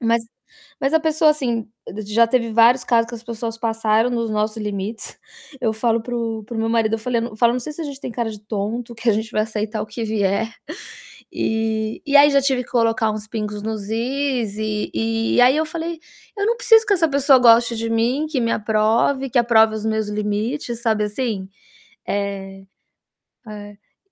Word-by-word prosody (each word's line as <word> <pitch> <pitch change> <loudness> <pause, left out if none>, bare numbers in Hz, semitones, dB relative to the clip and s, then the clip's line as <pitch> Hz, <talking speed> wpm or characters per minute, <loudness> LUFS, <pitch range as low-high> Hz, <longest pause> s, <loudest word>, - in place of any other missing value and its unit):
mas 230 -1 +1 0.6
mas 275 +2 0
a - - +6
pessoa 315 0 +3
assim 240 -7 -2 0.2
d 215 - -6
já 215 +3 +3
teve 230 -1 0
vários 235 +3 +5
casos 230 -1 +2
que 240 - -7
as 225 - -12
pessoas 230 0 -5
passaram 225 0 +1
nos 230 -2 -1
nosso 215 +1 -1
limites, 210 +1 -5 0.4
eu 225 -3 +1
falo 225 +1 0
para 245 +2 -6
o 225 -2 -3
para 230 +2 -7
o - - -3
meu 225 - 0
marido, 225 -1 +1
eu - - -2
falei 235 +1 -1
na 235 - -3
eu 215 - -12
falo: 235 +1 +3
"Não 250 - -2
sei 300 +5 -6
se 300 - -9
a - - -4
gente 280 -2 -7
tem - - -5
cara 235 -1 -2
de 210 -2 -10
tonto, 220 +3 -4
que 230 +2 -2
a - - +3
gente 220 +1 -2
vai 215 - +1
aceitar 215 0 -3
o - - -6
que 215 +2 -6
vier." 210 0 0 0.8
E 220 0 -2
e 285 0 +5
aí 290 +1 +7
já 280 0 +4
tive 265 -2 0
que - - -19
colocar 225 -2 +2
uns 215 0 -6
pingos 210 -2 -4
nos 220 -1 -4
is, 240 -2 -1
e 215 -1 -2 0.5
e - - +6
aí 250 +2 +6
eu 315 - +1
falei: 330 +1 -5 0.4
"Eu 405 - 0
não 470 +1 +1
preciso 450 -2 +5
que 410 - +4
essa 335 -4 +3
pessoa 280 -1 +5
goste 235 0 +5
de 230 0 -3
mim, 235 +6 +1
que 305 -4 -2
me 230 0 0
aprove, 220 +5 +1
que 255 - 0
aprove 225 -2 +4
os 220 0 -5
meus 220 -1 -1
limites", 215 +4 -3
sabe, 220 -3 +1
assim? 210 -3 -3 0.6
Eh, 195 -1 -4 0.8
é 205 - -13
230 Hz, 210 wpm, -21 LUFS, 215-250 Hz, 0.8 s, aí